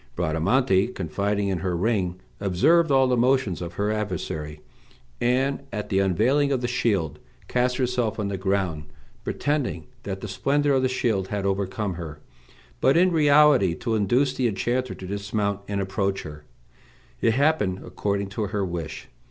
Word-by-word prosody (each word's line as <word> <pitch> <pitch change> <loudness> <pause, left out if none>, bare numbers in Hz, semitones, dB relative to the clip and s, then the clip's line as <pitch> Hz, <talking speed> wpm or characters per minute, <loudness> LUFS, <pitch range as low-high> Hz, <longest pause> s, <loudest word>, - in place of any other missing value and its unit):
Bradamante, 95 - +2
confiding 100 0 -2
in 95 -3 -1
her 90 -1 -1
ring, 95 -3 0 0.2
observed 145 - +3
all 135 -1 +5
the 125 - +2
motions 125 -6 +2
of 85 0 -5
her 100 +4 -1
adversary, 80 -7 -4 0.6
and, 130 +3 +1
at 105 - -4
the 95 - +2
unveiling 120 +10 +2
of 130 -3 0
the 120 - -1
shield, 100 - 0 0.3
cast 125 0 +1
herself 125 -4 0
on 105 - -1
the 100 - -2
ground, 95 -5 -1 0.4
pretending 140 - -1 0.2
that - - -5
the - - -5
splendor 145 +1 +1
of 135 - +3
the 130 - +1
shield 110 -7 0
had 100 0 -3
overcome 100 +1 -1
her, 80 -3 -7 0.6
but 135 - +4
in 180 +1 +4
reality 145 - +5
to 115 +4 -3
induce 120 +6 +2
the 130 -2 +1
enchanter 120 +4 -1
to 95 - -9
dismount 100 +1 -2
and 100 -1 -2
approach 100 0 -1
her. 75 0 -10 0.8
It 115 - +3
happened 135 -10 +1
according 100 -1 -2
to 105 +1 -3
her 100 0 -1
wish. 85 -3 -5
105 Hz, 160 wpm, -25 LUFS, 95-130 Hz, 0.8 s, all